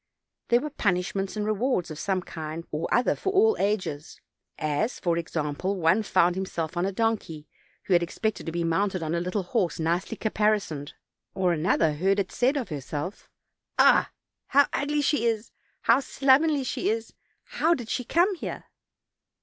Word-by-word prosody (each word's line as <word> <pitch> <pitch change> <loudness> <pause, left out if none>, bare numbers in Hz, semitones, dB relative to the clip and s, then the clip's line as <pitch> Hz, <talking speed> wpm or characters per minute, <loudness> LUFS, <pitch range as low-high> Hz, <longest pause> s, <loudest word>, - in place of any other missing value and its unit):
There 240 +1 +4
were 300 +1 -4
punishments 195 -3 -1
and 210 - -1
rewards 215 -4 0
of 155 - -7
some 190 -2 -1
kind 160 0 -6
or 155 +1 -3
other 245 - +3
for 385 - -2
all 430 +3 +4
ages; 185 -7 -2 0.4
as, 155 - -1
for 170 -2 +1
ex 170 0 -4
ample, 155 +6 -1
one 165 +5 +3
found 185 -4 +3
himself 175 -3 -4
on 175 +2 0
a - - -1
donkey, 195 -8 -2 0.4
who 190 - 0
had 175 - +5
expected 205 +5 -3
to - - -1
be 170 +1 -2
mounted 185 +2 0
on 160 +1 -2
a 170 - +1
little 180 +3 -2
horse 180 -4 -1
nicely 170 +7 -1
caparisoned; 210 -9 0 0.4
or 180 -2 +2
another 160 -1 +2
heard 190 +6 +1
it 195 -2 -1
said 260 +4 +1
of 250 -8 -3
herself: 150 +5 -5 0.5
"Ah! - - +5 0.4
how 280 +1 +5
ugly 295 +1 0
she 280 -5 +2
is; 225 -1 -2 0.3
how 230 +3 +5
slovenly 280 +2 +3
she 255 - -1
is; 225 +1 -2 0.3
how 335 +2 +1
did 240 -6 -7
she 250 - -2
come 350 - +2
here?" 360 - -6
195 Hz, 175 wpm, -26 LUFS, 170-235 Hz, 0.5 s, had